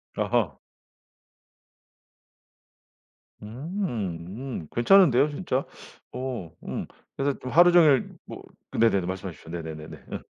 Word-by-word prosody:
아하. - - 0 2.8
음. 115 - -4 0.4
음 80 - -12
괜찮은데요, 145 0 +5
진짜. 145 -3 -2 0.5
어 125 -9 -5
음. - - -4 0.3
그래서 140 0 -1
좀 130 - -6
하루 175 +3 +7
종일 155 -7 +5 0.2
뭐 - - -9 0.4
네네네. 100 -5 +3
말씀하십시오. 90 -3 -6
네네네네. 80 -2 -7 0.2
어. - - -3
125 Hz, 210 characters per minute, -26 LUFS, 95-150 Hz, 2.8 s, 하루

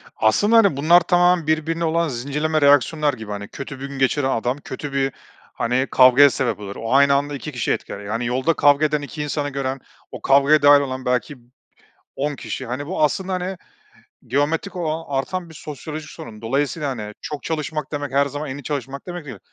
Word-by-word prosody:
Aslında, 205 - +3
hani, 200 -11 +4
bunlar 170 +5 +6
tamamen 175 -2 +3
birbirine 160 +2 0
olan 165 +1 +1
zincirleme 150 +4 -1
reaksiyonlar 145 +1 +4
gibi, 110 -4 -8
hani, 100 0 -5
kötü 140 +3 -8
gün 140 0 -7
geçiren 135 +1 +1
adam 125 +2 -1
kötü 140 0 -7
bir, 135 0 0 0.4
hani, 125 +3 0
kavgaya 130 +2 +7
sebep 125 -4 -2
olur. 100 -1 -7
O 115 +2 -3
aynı 140 0 +5
anda 145 +1 -1
2 130 - -6
kişiyi - - -2
etkiler, - - -6
yani, 110 +4 -3
yolda 130 +7 +1
kavga 145 +1 +4
eden 150 -1 0
2 150 +1 -6
insanı 145 0 -2
gören, 135 -1 -3 0.3
o - - -8
kavgaya 140 +3 +4
dâhil 145 0 +7
olan 130 -1 -4
belki 125 +3 -1 0.8
10 145 +1 -1
kişi. 130 - -6
Hani, 130 +5 -4
bu 175 -1 -2
aslında, 190 +5 -1
hani, 185 +1 -3 0.7
geometrik 155 - -1
olan, 165 -1 -2
artan 175 +6 -3
bir - - -13
sosyoloji 150 +1 -7
sorunu. 115 -10 -11
Dolayısıyla, 140 +4 -1
hani, 105 -4 -6
çok 150 -1 -6
çalışmak 155 -2 -4
demek 145 -2 -4
her 140 +1 +3
zaman 145 0 -5
en 140 - -5
iyi - - -9
çalışmak 140 +1 -5
demek 175 -2 -6
değil. 125 -8 -9
145 Hz, 190 wpm, -21 LUFS, 130-155 Hz, 0.8 s, kavgaya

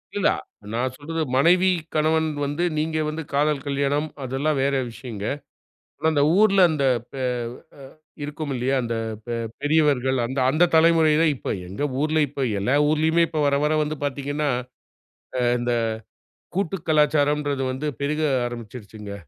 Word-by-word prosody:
இல்லா, - - +3 0.4
நான் 125 +2 -1
சொல்றது 160 +4 -4
மனைவி, 180 +7 +5 0.2
கணவன் 160 +1 +2 0.2
வந்து 145 +4 -1
நீங்க 155 +1 -1
வந்து 160 +1 -4
காதல் 145 0 +1
கல்யாணம், 140 +2 0 0.2
அதெல்லாம் 135 +3 -1
வேறு 135 0 +1
விஷயங்க. 115 -3 -7 0.7
ஆனா 160 - +1
அந்த 145 - +2 0.2
ஊர்ல 200 -2 +5
அந்த 150 -3 -1 0.3
பே 135 - -6
அ - - +1 1.0
இருக்கும் 150 0 -5
இல்லையா, 130 +2 0
அந்த 115 0 -2 0.3
பெ 120 -1 -3 0.3
பெரியவர்கள் 145 -4 +2
அந்த 135 +2 -3
அந்த 165 +5 +3
தலைமுறைகள் 160 -1 +4
இப்ப - - -3
எங்கள் 130 +9 -3
ஊர்ல 155 +1 +2
இப்ப 135 0 -3
எல்லா 125 +8 +1
ஊர்லயுமே 160 +2 +3
இப்ப 155 -2 -1
வர 140 0 +2
வர 150 - +2
வந்து 150 +1 -4
பார்த்தீங்கன்னா, 145 +1 -2 1.1
இந்த 120 0 -1 0.8
கூட்டு 195 -1 -1
கலாச்சாரம்ன்றது 150 -2 +2
வந்து 135 +4 -3
பெருக 150 +2 -1 0.3
ஆரம்பிச்சுடுச்சுங்க. 110 -3 -8
145 Hz, 135 wpm, -23 LUFS, 135-155 Hz, 1.1 s, மனைவி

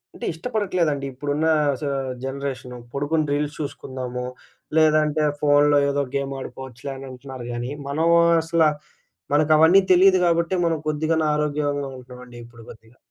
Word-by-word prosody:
అంటే - - -7
ఇష్టపడట్లేదండి, 170 - -1
ఇప్పుడున్నా 145 +4 0 0.3
స - - -6 0.4
generation. 135 -2 -5 0.2
పొడుకుని 150 +3 0
reels 145 0 -1
చూసుకుందాము, 130 -3 -5 0.5
లేదంటే 155 -1 +3 0.2
ఫోనులో 145 0 +4
ఏదో 140 0 0
గేమ్ 140 0 -2
ఆడుకోవచ్చులే 130 0 -8
అనంటున్నారు 130 -1 -9
గానీ 120 +3 -4 0.2
మనం 155 +4 0 0.4
అసలా 165 -1 +2 0.6
మనకవన్నీ 155 +5 +5
తెలీదు 185 +1 +6
గాబట్టే 170 +1 +1
మనం 165 -1 +1
కొద్దిగన్న 155 +1 0
ఆరోగ్యంగా 145 -2 -1
ఉంటున్నామండి 125 -1 -12
ఇప్పుడు 115 -1 -15
కొద్దిగా. 115 +3 -15
145 Hz, 120 wpm, -23 LUFS, 130-160 Hz, 0.6 s, తెలీదు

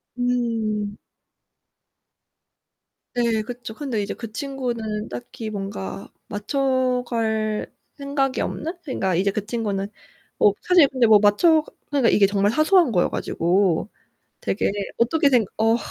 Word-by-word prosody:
음. 225 -4 -1 2.2
네 230 -2 +1
그쵸. 240 0 -7
근데 245 -6 -3
이제 200 - -4
그 230 -2 -8
친구는 235 -5 -4
딱히 240 -2 -7
뭔가 195 -1 -5 0.2
맞춰 255 +3 0
갈 220 -2 -1 0.2
생각이 280 -2 -1
없는? 325 +4 -3
그러니까 190 - -1
이제 195 +3 +2
그 205 0 -3
친구는 210 -4 -2 0.5
어 205 - +6
사실 355 -6 +5
근데 255 -4 +2
뭐 215 -1 +8
맞춰 305 - +4 0.3
그러니까 275 -5 +3
이게 200 -2 +5
정말 200 +1 +1
사소한 310 0 +4
거여 180 -4 +2
가지고 180 +2 0 0.5
되게 195 - 0 0.3
어떻게 285 +6 +3
생 245 -5 +4
어 225 +1 +3
230 Hz, 245 characters per minute, -23 LUFS, 210-260 Hz, 2.2 s, 뭐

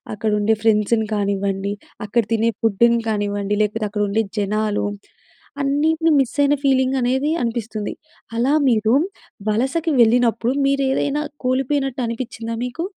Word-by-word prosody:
అక్కడ 215 +1 -1
ఉండే 215 +2 +2
ఫ్రెండ్స్‌ని 220 0 +2
కానివ్వండి, 200 -1 -1 0.3
అక్కడ 230 +3 +1
తినే 225 +1 +2
ఫుడ్‌ని 235 +2 +3
కానివ్వండి, 205 -1 -1
లేకపోతే 215 +1 -1
అక్కడ 210 0 -3
ఉండే 220 +3 +1 0.2
జనాలు. 210 +1 0 0.8
అన్నిటిని 315 +4 +2
మిస్ 265 -3 0
అయిన 285 0 +4
ఫీలింగ్ 265 -1 +2
అనేది 260 +4 +1
అనిపిస్తుంది. 225 -3 -3 0.4
అలా 245 +5 +2 0.2
మీరు 220 -1 +2 0.6
వలసకి 270 +10 0
వెళ్ళినప్పుడు 235 +1 +3
మీరు 275 0 +1
ఏదైనా 285 +2 0 0.2
కోల్పోయినట్టు 270 +1 0
అనిపిచ్చిందా 230 -1 -5
మీకు? 250 +7 -4
230 Hz, 125 wpm, -20 LUFS, 210-265 Hz, 0.8 s, అయిన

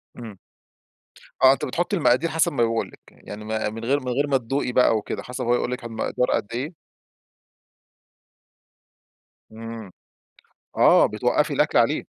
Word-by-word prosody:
امم. 110 -5 -10 1.1
آه، 130 +1 +8
أنتِ 135 - -4
بتحطي 175 +9 -2
المقادير 150 0 +2
حسب 160 0 +1
ما 120 -4 +1
بيقول 115 0 0
لِك - - -17
يعني، - - -24
يعني 105 +1 -8
ما 110 0 -2
من 115 +2 -8
غير 140 +4 +2
من 130 - -10
غير 140 +4 0
ما 135 -1 +2
تدوقي 125 +1 -2
بقى 120 -3 +3
وكده 105 - -5
حسب 125 +1 -6
هو 120 +1 +3
يقول 125 - -2
لِك 125 -1 -5
المقدار 115 +2 -2
قد - - 0
إيه. 140 +8 -4 2.8
امم، 115 -2 -9 0.8
آه - - +6
بتوقفي - - 0
الأكل - - +1
عليه. - - +2
125 Hz, 155 wpm, -23 LUFS, 115-135 Hz, 2.8 s, آه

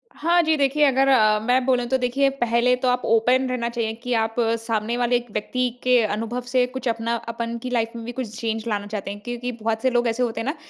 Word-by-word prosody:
हाँ 345 +2 +3
जी, 315 0 +2
देखिए 285 +2 +2
अगर 270 0 +3
अ, 215 -5 +4
मैं 250 +4 +1
बोलूँ 250 -2 +2
तो 265 - +2
देखिए, 260 +2 +1
पहले 240 -2 +1
तो 250 0 -2
आप 250 0 +2
ओपन 250 +4 +3
रहना 235 -2 -1
चाहिए 230 -2 -2
कि 250 -1 -2
आप 225 -1 0 0.2
सामने 225 0 -2
वाले 245 0 +1
एक 240 0 -2
व्यक्ति 250 +4 -1
के 250 0 +4
अनुभव 225 +3 -2
से 250 -1 +3
कुछ 260 0 -6
अपना 230 0 -1 0.2
अपन 235 0 -4
की 255 - -3
लाइफ़ 230 -2 0
में 230 - -6
भी 240 - -5
कुछ 235 -3 -6
चेंज 225 0 -3
लाना 205 -2 -2
चाहते 205 -2 -5
हैं। 205 - -8
क्योंकि 245 0 -4
बहुत 225 0 -1
से 260 - +2
लोग 240 -1 +1
ऐसे 235 +2 0
होते 225 -2 -2
हैं 225 - -5
ना 285 - -2
240 Hz, 245 wpm, -23 LUFS, 225-255 Hz, 0.2 s, अ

